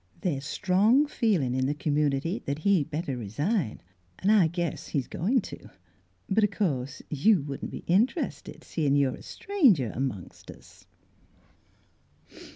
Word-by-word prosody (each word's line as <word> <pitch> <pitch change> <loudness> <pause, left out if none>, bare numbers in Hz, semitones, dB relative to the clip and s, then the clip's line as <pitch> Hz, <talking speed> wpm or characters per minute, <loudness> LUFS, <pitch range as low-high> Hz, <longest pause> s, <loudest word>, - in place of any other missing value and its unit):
" - - -29
The's 140 -6 -1
strong 210 - +3
feelin' 200 - 0
in 130 0 0
the 145 - -1
community 150 +3 0
that 140 +1 -1
he'd 160 -2 +2
better 155 -2 -3
resign, 125 - -2 0.4
an' 200 - +1
I 200 -6 +5
guess 170 +1 -3
he's 140 -5 -1
goin' 225 - 0
to. - - -10 0.6
But 215 +3 +2
o' - - +5
course 140 - -2
you 160 +3 +3
wouldn't 140 -1 -5
be - - -8
interested, 220 - 0
seein' 145 -4 0
you're 140 -2 +2
a - - -14
stranger 245 - +2
amongst 125 -8 -5
us." - - -15
160 Hz, 145 wpm, -27 LUFS, 140-200 Hz, 0.6 s, I